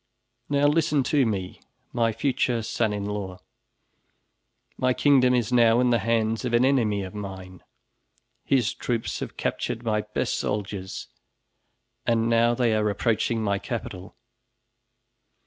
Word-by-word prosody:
Now 145 Hz, 0 st, +2 dB
listen 150 Hz, -1 st, +2 dB
to 140 Hz, -5 st, +4 dB
me, 95 Hz, -4 st, -4 dB, 0.3 s
my 115 Hz, -1 st, +2 dB
future 120 Hz, 0 st, 0 dB
son 110 Hz, 0 st, 0 dB
in 100 Hz, -1 st, -3 dB
law. 100 Hz, -3 st, -4 dB, 1.4 s
My 130 Hz, 0 st, +1 dB
kingdom 130 Hz, -3 st, +4 dB
is 120 Hz, 0 st, 0 dB
now 115 Hz, -1 st, +5 dB
in 125 Hz, -1 st, +3 dB
the 120 Hz, -, +3 dB
hands 110 Hz, 0 st, 0 dB
of 120 Hz, -2 st, 0 dB
an 120 Hz, +2 st, +4 dB
enemy 110 Hz, -7 st, +1 dB
of 95 Hz, -, -8 dB
mine. 95 Hz, -3 st, -8 dB, 0.8 s
His 125 Hz, -5 st, +1 dB
troops 115 Hz, -2 st, -3 dB
have -, -, -7 dB
captured 115 Hz, -, -3 dB
my 110 Hz, -2 st, 0 dB
best 105 Hz, 0 st, -2 dB
soldiers 100 Hz, -2 st, -4 dB, 1.0 s
and 115 Hz, -1 st, +1 dB
now 115 Hz, +1 st, +3 dB
they 120 Hz, -2 st, +2 dB
are 105 Hz, -1 st, +1 dB
approaching 110 Hz, +2 st, 0 dB
my 100 Hz, -1 st, 0 dB
capital. 100 Hz, -7 st, -6 dB
115 Hz, 135 wpm, -25 LUFS, 105-125 Hz, 1.4 s, now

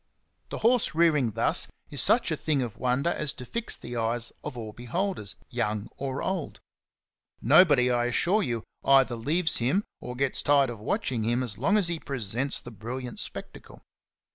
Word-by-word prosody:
The -, -, -4 dB
horse 235 Hz, -10 st, +3 dB
rearing 150 Hz, -9 st, +3 dB
thus 115 Hz, -, +1 dB, 0.2 s
is -, -, -2 dB
such -, -, +3 dB
a -, -, +2 dB
thing 145 Hz, -4 st, 0 dB
of 115 Hz, -3 st, -6 dB
wonder 130 Hz, +6 st, +1 dB
as 150 Hz, -, -1 dB
to 125 Hz, -, -9 dB
fix 235 Hz, -, -2 dB
the 120 Hz, -, -7 dB
eyes 115 Hz, +1 st, 0 dB
of 125 Hz, -, -6 dB
all 110 Hz, -2 st, -6 dB
beholders, 125 Hz, -, -2 dB, 0.2 s
young 105 Hz, +1 st, -2 dB
or 135 Hz, 0 st, -4 dB
old. 185 Hz, -5 st, -3 dB, 0.8 s
Nobody, 140 Hz, -, +5 dB
I 120 Hz, 0 st, +2 dB
assure 175 Hz, -, +2 dB
you, 120 Hz, -, -2 dB, 0.2 s
either 135 Hz, -2 st, +5 dB
leaves 160 Hz, +8 st, +1 dB
him 135 Hz, -, +1 dB, 0.2 s
or 125 Hz, -, -7 dB
gets 135 Hz, +1 st, 0 dB
tired 140 Hz, -3 st, +3 dB
of 115 Hz, -, -8 dB
watching 115 Hz, +2 st, -1 dB
him 120 Hz, +3 st, +1 dB
as 110 Hz, -5 st, -6 dB
long 200 Hz, -, +3 dB
as 200 Hz, -5 st, +1 dB
he 170 Hz, -1 st, -2 dB
presents 130 Hz, -1 st, -2 dB
the 120 Hz, -, -10 dB
brilliant 120 Hz, +3 st, -6 dB
spectacle. -, -, -7 dB
130 Hz, 175 wpm, -27 LUFS, 120-155 Hz, 0.8 s, Nobody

